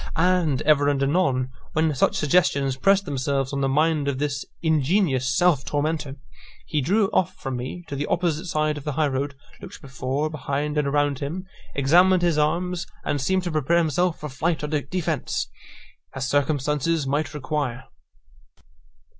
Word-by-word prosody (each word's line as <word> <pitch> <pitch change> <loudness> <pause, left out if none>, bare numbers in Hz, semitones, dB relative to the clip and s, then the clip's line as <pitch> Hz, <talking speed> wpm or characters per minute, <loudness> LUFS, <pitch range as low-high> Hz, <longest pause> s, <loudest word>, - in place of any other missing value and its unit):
And 170 -5 +2
ever 145 -2 +4
and 140 -1 +1
anon, 135 -4 +1 0.2
when 155 0 +2
such 130 - +2
suggestions 140 -4 +2
pressed 195 +8 +3
themselves 135 0 -1
on 140 - -1
the 135 - +1
mind 150 +1 +2
of 140 -2 0
this 145 0 -2 0.2
ingenious 155 -3 +2
self 150 -1 +3
tormentor, 150 -1 -2 0.5
he 150 - -1
drew 195 +9 +2
off 185 - 0
from 135 -2 -5
me 130 +8 -6
to 145 - -5
the 145 +1 -2
opposite 170 0 0
side 155 -2 0
of - - -12
the 150 - -3
high 155 +1 +2
road, 140 +1 -2 0.3
looked - - -10
before, 135 +2 -3
behind, 150 0 -2
and 150 -2 +1
around 145 -1 +1
him, 165 +7 -4 0.3
examined 175 +6 +4
his 170 -3 +2
arms, 175 +4 0 0.2
and 145 - -1
seemed 185 +7 +1
to 175 - -3
prepare 155 +2 +2
himself 170 +1 +1
for 150 - -5
flight 155 +4 -1
or - - -1
defence, 160 -1 -2 0.6
as 135 -1 -2
circumstances 145 +2 +1
might 145 +2 -1
require. 145 -4 -3
150 Hz, 165 wpm, -24 LUFS, 140-165 Hz, 0.6 s, ever